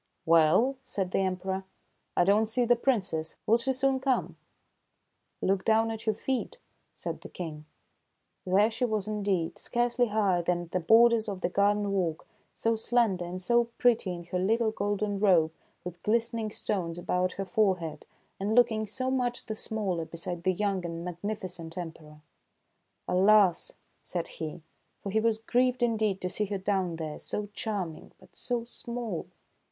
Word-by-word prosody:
"Well," 165 - +4
said 195 -8 -2
the - - +1
Emperor, 190 0 -1 0.5
"I - - +6
don't 205 +4 +3
see 240 +3 +2
the 240 +1 +5
Princess. 200 -11 0
Will 230 +2 +4
she 265 +3 +1
soon 265 +1 +1
come? 265 -1 0 0.4
" - - -49
" - - -49
Look 190 0 +1
down 225 0 +3
at 225 0 -7
your 215 - +2
feet," 265 - -3 0.3
said - - -6
the - - -10
King. 155 -4 -7 0.8
There 200 +4 +3
she 235 - -3
was 215 -4 0
indeed, 200 -6 -1
scarcely 240 0 +1
higher 205 -5 +2
than 175 0 -1
the 185 - 0
borders 225 +4 +5
of 190 -2 -5
the - - 0
garden 205 +1 +2
walk, 175 -5 -1 0.3
so 230 0 +1
slender 220 -5 +1
and 180 +1 -5
so 235 +5 +3
pretty 230 -6 +3
in 175 -1 -6
her 180 +2 -3
little 220 +4 +2
golden 205 -1 -1
robe 175 -6 +4 0.3
with 175 -1 -8
glistening 230 0 0
stones 175 -5 -2
about 180 +1 0
her 195 - -4
forehead, 185 -5 0 0.3
and 205 +3 0
looking 220 -3 +3
so 260 +3 -1
much 245 -2 -1
the 220 - -4
smaller 195 -7 -1
beside 170 +1 -4
the 185 - +2
young 195 -1 -1
and 170 0 -5
magnificent 180 -2 -5
Emperor. 160 -3 -8 0.5
" - - -48
Alas! 195 -1 +4
" - - -43
said 175 -2 -3
he; 160 +1 -6 0.4
for 200 - -5
he 220 - +2
was 220 0 +2
grieved 245 +2 +1
indeed 215 -4 +1
to 185 - -1
see 210 - 0
her 200 0 -3
down 190 -3 -1
there, 155 -2 -5
so 205 -1 -3
charming, 200 -9 -4
but - - -19
so 245 -2 0
small. 235 -5 -4
200 Hz, 170 wpm, -29 LUFS, 180-225 Hz, 0.8 s, I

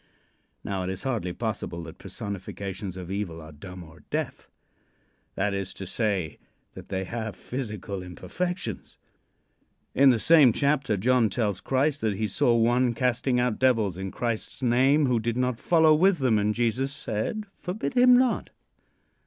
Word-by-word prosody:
Now, 95 -2 -3
it 90 - -3
is 95 0 -5
hardly 115 -9 -2
possible 90 -4 -4
that 80 -1 -11
personifications 100 -1 -6
of 90 0 -7
evil 95 -5 -3
are 80 0 -11
dumb 90 +4 -10
or 80 0 -15
deaf. - - -4 0.9
That 100 +1 0
is 95 -1 -4
to 95 - -6
say, 95 -6 0 0.3
that - - -11
they 95 0 -2
have 110 0 -5
physical 105 -5 -5
imperfections. 115 - -5 1.0
In 135 +1 +6
the 125 - +4
same 145 -1 +6
chapter 140 -6 +1
John 120 +2 +3
tells 105 -2 -1
Christ 140 +2 0
that 110 -3 0
he 110 +1 0
saw 120 +4 +2
one 120 +1 +2
casting 125 +1 +1
out 125 -3 0
devils 115 -8 +2
in 95 +1 -5
Christ's 120 +4 -4
name 135 +5 +4
who 125 -3 +2
did 115 +1 -2
not 125 -2 0
follow 160 -2 +4
with 180 +4 +4
them, 125 -7 +2
and 105 +1 0
Jesus 120 +3 0
said: 150 - -3
"Forbid 190 +8 -4
him 250 0 +6
not." 255 -2 +1
115 Hz, 160 wpm, -26 LUFS, 95-130 Hz, 1.0 s, In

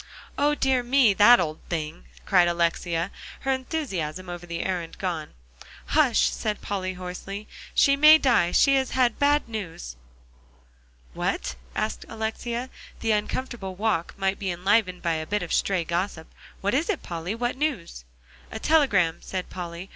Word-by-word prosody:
"O, 295 +1 +2
dear 265 -3 +2
me! 245 -3 +4
that 215 +5 +7
old 155 -3 -2
thing," 155 - -4 0.2
cried 175 -1 +4
Alexia, 170 +1 0 0.3
her 270 - 0
enthusiasm 195 - -3
over 175 0 -7
the 170 0 -3
errand 175 -3 -3
gone. 170 -5 -4 0.5
"Hush!" - - +4
said 215 -1 -3
Polly 185 -2 -3
hoarsely; 185 +3 -7 0.3
"she 275 - +5
may 305 +2 +8
die. 245 - +3
She 275 - +4
has 265 -1 0
had 245 -3 +2
bad 290 0 +3
news." 180 - -6 1.2
"What?" - - -2 0.2
asked - - -2
Alexia; 235 +3 -4 0.3
the 225 - +1
uncomfortable 210 -2 -2
walk 200 -4 -1
might 195 0 0
be 195 - -2
enlivened 185 +1 +1
by 170 -1 +1
a 155 0 -3
bit 210 +1 -1
of 175 - -4
stray 190 -3 +1
gossip; 170 -1 -3 0.3
"what 200 +3 0
is 300 +8 +1
it, 400 - -1
Polly? 170 +4 -4
What 240 +1 -2
news?" 255 - -3 0.5
"A - - -5
telegram," 210 - +3
said 185 -1 -5
Polly. 175 0 -6
195 Hz, 155 wpm, -25 LUFS, 170-245 Hz, 1.2 s, may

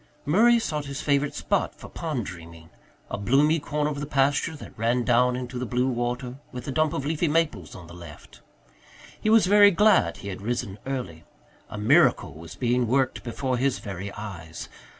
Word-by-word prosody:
Murray 230 +10 +5
sought 150 -10 -3
his 140 0 -6
favourite 140 0 +1
spot - - -1
for - - -11
pond 150 -9 -4
dreaming 85 -2 -11 0.4
a 100 - -3
bloomy 145 +9 +3
corner 150 +1 -2
of 145 - -5
the 145 - -4
pasture 140 +3 +1
that 145 - -11
ran 120 +2 0
down 125 +1 +3
into 125 0 -5
the 125 - -3
blue 125 +2 0
water, 125 +1 -3
with 125 -2 -8
a - - -2
dump 155 +2 +1
of 140 -4 -3
leafy 160 +3 0
maples 150 - -1
on 90 - -10
the 85 - -13
left. 85 -4 -13 0.8
He 215 - 0
was 220 -2 +6
very 205 +2 +7
glad 200 - +3
he 100 - -7
had 95 - -7
risen 105 -3 -3
early. 105 -12 -5 0.5
A - - -7
miracle 115 - +3
was 80 +2 -11
being 125 -1 +1
worked 130 +2 +1
before 125 +2 -2
his 130 +1 +1
very 100 -1 -6
eyes. 90 -6 -8
125 Hz, 190 wpm, -25 LUFS, 105-150 Hz, 0.8 s, very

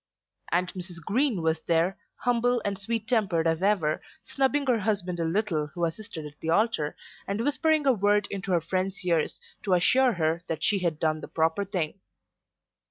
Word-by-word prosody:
And 180 +2 +1
Mrs. 180 -2 -5
Green 220 - 0
was 160 0 +1
there, 170 +3 +1 0.2
humble 245 0 +1
and 200 -1 0
sweet 215 +3 -3
tempered 200 -9 +1
as 165 +1 +1
ever, 190 -7 +2 0.2
snubbing 275 +1 +1
her 245 -4 +2
husband 190 -4 -1
a - - +1
little 165 -3 0
who 170 +3 -2
assisted 165 -2 -5
at 150 0 -11
the 160 - -4
altar, 170 -5 +1 0.3
and 200 +3 -1
whispering 305 +2 +2
a 270 - +5
word 205 -1 +2
into 195 -1 -4
her 175 -2 +3
friend's 185 +3 -2
ears 165 -3 +1 0.2
to 190 -3 +2
assure 255 +8 +4
her 165 -1 0
that 160 -1 -3
she 205 -2 +3
had 170 -4 -1
done 155 -1 0
the - - -7
proper 160 +5 +1
thing. 185 -3 -3
185 Hz, 180 wpm, -27 LUFS, 165-215 Hz, 0.3 s, a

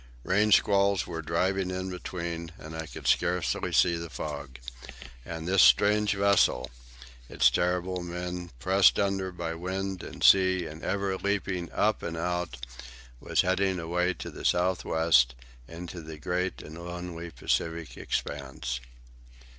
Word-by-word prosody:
Rain 105 +3 +2
squalls 100 -1 +4
were 80 -2 -5
driving 90 +4 0
in 95 0 -3
between, 85 -2 -5
and 80 -2 -9
I 80 -1 -5
could - - -10
scarcely 90 0 +1
see 85 -1 +4
the 85 0 -6
fog. 70 -5 -6 0.7
And 80 0 -5
this 95 +1 +4
strange 105 +12 +5
vessel, 100 -8 +3 0.6
with - - -10
its - - +6
terrible 90 +1 0
men, 90 0 -5
pressed 95 +9 +4
under 95 -2 0
by 85 -2 -4
wind 95 +2 -4
and - - -8
sea 95 -2 +5
and 80 0 -8
ever 100 0 -1
leaping 95 -3 -2
up - - +1
and 85 - -4
out, 85 -7 -3 0.5
was - - +1
heading 95 +1 +1
away 90 +1 0
into 95 - -5
the - - -10
south 90 +1 +2
west, 65 -7 +3 0.3
into 85 +1 -8
the 80 0 -9
great 90 +4 -2
and 80 +3 -9
lonely 85 -1 -6
Pacific 80 +3 -2
expanse. 65 -3 -4
90 Hz, 145 wpm, -28 LUFS, 80-95 Hz, 0.7 s, its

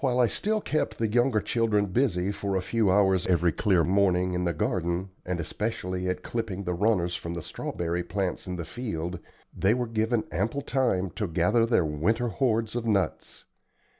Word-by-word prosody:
While 125 -3 +1
I 125 - +6
still 215 - 0
kept 115 - -1
the 115 - +1
younger 120 +1 +2
children 110 -3 +1
busy 100 -3 +1
for 100 -1 -3
a 95 - +1
few 110 +1 +1
hours 95 -2 +3
every 90 -2 +3
clear 95 -4 +2
morning 90 -1 +2
in 90 0 -1
the 85 - +1
garden, 95 -3 -1 0.2
and 90 -1 -1
especially 90 0 -3
at 90 0 -3
clipping 110 -5 -3
the 90 -1 -2
runners 90 -2 +1
from 85 0 -5
the 85 - -5
strawberry 85 +2 -3
plants 95 +1 -3
in 90 - -3
the 85 -2 -5
field, 90 -3 -4 0.4
they 100 +4 +3
were 125 -1 -1
given 110 0 0
ample 110 +10 -1
time 95 -11 0
to 105 - -3
gather 100 +8 +2
their 115 -8 +3
winter 105 +11 0
hoards 115 -2 0
of 120 - -1
nuts. 100 -4 -1
100 Hz, 185 wpm, -27 LUFS, 90-115 Hz, 0.4 s, I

